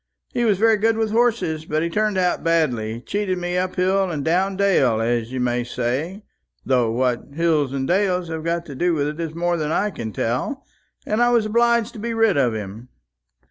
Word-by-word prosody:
He 240 - +1
was 210 -4 +3
very 220 +1 +4
good 225 +2 +2
with 220 -1 0
horses; 210 -10 +1
but 155 0 -1
he 170 - -1
turned 210 +1 0
out 180 -1 +1
badly, 125 -10 0
cheated 200 +3 -2
me 175 0 -3
up 185 0 -1
hill 190 +1 +1
and 150 -5 -3
down 185 +4 +1
dale, 155 - +3
as 115 0 -1
you 130 - -3
may 120 0 0
say 130 - -3 0.4
though 125 -3 +2
what 125 +1 0
hills 155 -5 +1
and 135 -1 -2
dales 180 -1 +1
have 160 -1 -4
got 170 +1 -1
to 145 - -8
do 175 +5 +1
with 145 -2 0
it 150 +2 -4
is 165 -1 -4
more 175 0 0
than 155 -1 -2
I 205 +5 +1
can 115 - -6
tell 125 - -2 0.4
and 215 +3 0
I 240 - +5
was 235 -3 +3
obliged 235 +1 +2
to 220 - -9
get 230 +2 -3
rid 225 -2 +3
of 125 -5 +2
him." 110 +4 -7
170 Hz, 215 wpm, -22 LUFS, 130-205 Hz, 0.4 s, I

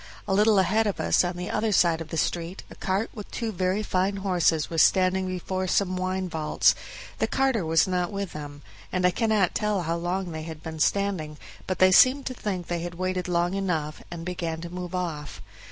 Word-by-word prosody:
A - - 0
little 210 +1 +4
ahead 210 +4 +3
of 200 - -2
us - - +3
on 175 0 -2
the 180 +1 -4
other 215 0 0
side 170 -4 +3
of 165 - -6
the 165 - -5
street 170 +3 -2
a - - -10
cart 195 +4 -1
with 210 -3 -8
two 230 -2 -3
very 185 +2 0
fine 190 0 0
horses 175 -5 +1
was 165 -2 +2
standing 185 0 +3
before 185 +1 -3
some 185 0 +1
wine 185 0 -2
vaults; 160 -3 +2 0.5
the - - +1
carter 265 -7 +1
was 160 +1 +3
not 180 -1 -1
with 200 -2 -4
them, 145 -1 -8 0.3
and 185 -1 0
I 180 - +5
cannot 215 -2 +1
tell 210 -4 0
how 165 +1 -1
long 175 +1 -2
they 160 -1 -5
had 160 -1 -8
been 160 -1 -6
standing, 180 -5 0 0.3
but 185 - -1
they 185 0 +6
seemed 260 +8 +6
to 255 - -3
think 190 -7 -4
they 175 0 -2
had 175 0 -5
waited 185 0 -2
long 175 0 +1
enough, 165 -6 -2
and 170 -1 -7
began 170 -2 -3
to 170 0 -7
move 180 0 -5
off. 160 -5 -4
180 Hz, 215 wpm, -26 LUFS, 170-195 Hz, 0.5 s, they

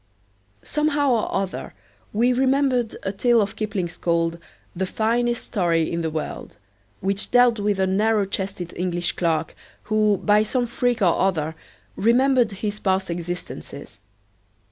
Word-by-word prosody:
Somehow 295 -2 +1
or 230 -3 +1
other 195 -1 -3 0.4
we 240 +4 +2
remembered 260 -2 +1
a 195 - -1
tale 235 +4 +3
of 200 -2 -1
Kipling's 190 -5 -3
called 170 0 0 0.4
"The 190 +2 -1
Finest 235 +3 0
Story 170 -6 0
In 170 - -1
The 160 - -1
World," 155 -8 -5 0.4
which 195 +1 -2
dealt 245 -2 +4
with 205 -1 0
a 190 - +3
narrow 210 +2 +2
chested 190 -3 -4
English 175 -1 -1
clerk, 160 -2 -1 0.3
who, 215 -1 +2
by 210 +2 +3
some 245 +3 0
freak 240 -1 0
or 175 -3 +3
other, 160 -5 0 0.4
remembered 245 +1 +3
his 205 +1 -4
past 190 -2 0
existences. 170 - -6
205 Hz, 140 wpm, -23 LUFS, 175-235 Hz, 0.4 s, dealt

